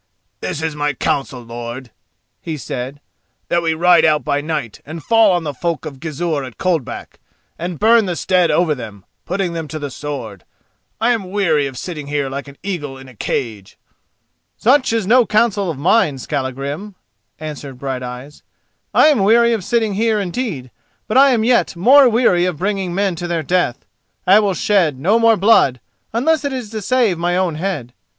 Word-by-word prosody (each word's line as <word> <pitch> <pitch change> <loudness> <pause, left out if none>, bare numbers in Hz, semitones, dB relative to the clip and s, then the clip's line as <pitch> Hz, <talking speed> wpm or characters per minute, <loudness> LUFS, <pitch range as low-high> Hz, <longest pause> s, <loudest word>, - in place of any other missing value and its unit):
"This 160 - -4
is 160 -2 -2
my 145 0 -1
counsel, 135 -1 -2
lord," 120 +1 -7 0.5
he 160 -2 -5
said, 135 +1 -6 0.5
"that 170 - +2
we 165 -1 0
ride 175 +1 +5
out 155 -1 +3
by 145 -1 0
night 150 -7 -4
and 160 +1 -8
fall 225 -3 +4
on 175 -2 0
the 145 -2 -4
folk 165 +3 -3
of 140 -4 -8
Gizur 155 -1 -2
at 130 -3 -9
Coldback, 160 -10 -3 0.4
and 175 0 -4
burn 225 +1 +4
the 175 - -2
stead 180 0 +2
over 170 -3 +2
them, 110 -8 -9 0.2
putting 180 0 -1
them 165 -2 -4
to 155 - -6
the 145 -2 -5
sword. 125 -10 -6 0.6
I 235 +2 +2
am 210 -6 -2
weary 165 -8 +1
of 135 -2 -9
sitting 150 -1 -6
here 145 -2 -1
like 140 +1 -5
an 140 0 -13
eagle 150 -9 -4
in 135 0 -12
a 130 - -13
cage." 110 -3 -4 0.8
"Such 260 +2 +3
is 225 -3 0
no 245 +5 +5
counsel 210 -3 +1
of 160 - -4
mine, 165 -1 +2
Skallagrim," 140 +8 -4 0.4
answered 145 -4 -7
Brighteyes. 130 +1 -6 0.5
"I - - +6
am 290 -6 +3
weary 235 +4 +4
of 220 -5 -2
sitting 225 0 0
here, 220 +1 +1
indeed; 180 - -4 0.4
but 215 - -3
I 275 +1 +7
am 235 -4 +2
yet 240 -4 +2
more 255 +9 +6
weary 220 -7 +3
of 180 -4 -2
bringing 190 -1 -2
men 195 -1 +1
to 175 - -4
their 170 -2 -2
death. 175 -5 0 0.4
I 195 +3 +6
will 200 -3 0
shed 175 -10 +2
no 195 - +2
more 230 -1 +4
blood, 180 - +4 0.3
unless 280 +6 +1
it 285 -1 -2
is 245 -5 -5
to 220 -1 -4
save 220 -5 +1
my 175 +1 0
own 185 -3 0
head. 155 -7 -4
170 Hz, 185 wpm, -18 LUFS, 140-210 Hz, 0.8 s, I